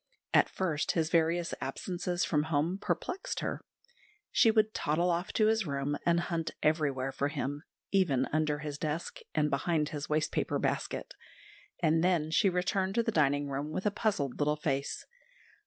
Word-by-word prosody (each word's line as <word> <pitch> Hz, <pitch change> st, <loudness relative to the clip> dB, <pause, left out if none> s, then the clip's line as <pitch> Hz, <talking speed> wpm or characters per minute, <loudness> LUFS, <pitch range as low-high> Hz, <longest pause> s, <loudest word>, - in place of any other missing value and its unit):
At -, -, +5 dB
first 160 Hz, -5 st, -1 dB
his 160 Hz, -1 st, 0 dB
various 170 Hz, +1 st, +2 dB
absences 175 Hz, +5 st, -2 dB
from 150 Hz, -2 st, +1 dB
home 160 Hz, +4 st, 0 dB
perplexed 360 Hz, -, -2 dB
her. -, -, -3 dB, 0.7 s
She 235 Hz, -, +5 dB
would 215 Hz, -1 st, +3 dB
toddle 170 Hz, +4 st, +1 dB
off 175 Hz, +2 st, -1 dB
to 215 Hz, -, +3 dB
his 220 Hz, -3 st, +2 dB
room 140 Hz, 0 st, -1 dB
and 170 Hz, 0 st, +4 dB
hunt 165 Hz, -2 st, -2 dB
everywhere 140 Hz, -4 st, +1 dB
for 140 Hz, -, -1 dB
him, 145 Hz, 0 st, -3 dB, 0.3 s
even 150 Hz, -10 st, +3 dB
under 155 Hz, -1 st, +1 dB
his 145 Hz, -1 st, -5 dB
desk 155 Hz, +2 st, -3 dB, 0.2 s
and 150 Hz, -1 st, +2 dB
behind 150 Hz, +2 st, +1 dB
his 145 Hz, -1 st, -5 dB
waste 150 Hz, 0 st, +1 dB
paper -, -, 0 dB
basket, -, -, -2 dB, 0.7 s
and 160 Hz, +1 st, +3 dB
then 170 Hz, -4 st, +2 dB
she 195 Hz, +4 st, +4 dB
returned 190 Hz, +2 st, 0 dB
to 235 Hz, -, +3 dB
the 225 Hz, -, 0 dB
dining 145 Hz, -4 st, +2 dB
room 140 Hz, +2 st, -3 dB
with 185 Hz, +6 st, -4 dB
a 210 Hz, -, +3 dB
puzzled 195 Hz, -, -1 dB
little 150 Hz, +1 st, +2 dB
face. 140 Hz, -2 st, -2 dB
160 Hz, 170 wpm, -31 LUFS, 145-180 Hz, 0.7 s, At